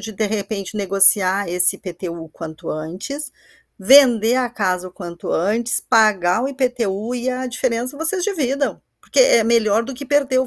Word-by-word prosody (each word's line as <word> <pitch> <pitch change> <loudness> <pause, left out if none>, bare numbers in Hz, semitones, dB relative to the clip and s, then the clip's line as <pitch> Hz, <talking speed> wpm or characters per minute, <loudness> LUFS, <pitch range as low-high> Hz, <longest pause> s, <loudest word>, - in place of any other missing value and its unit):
de, 220 - -7
de 215 +1 -2
repente, 205 -1 -4
negociar 195 -1 +3
esse 180 +2 +3
IPTU 180 -2 -7
o 160 - -16
quanto 160 -1 -9
antes, 195 - -6 0.5
vender 240 +1 +5
a 255 -1 0
casa 185 -5 -2
o - - -18
quanto 175 -3 -8
antes, 225 +7 0
pagar 210 -3 +2
o 270 - -1
IPTU 245 -5 -2
e 245 +1 -3
a 255 0 -3
diferença 250 +1 -2
vocês 350 +4 0
dividam, 280 - -2 0.2
porque - - +1
é 235 - +5
melhor 225 -1 +2
do 270 - -7
que 280 +2 -9
perder 275 -3 +1
o 260 - 0
225 Hz, 170 wpm, -19 LUFS, 190-255 Hz, 0.5 s, vender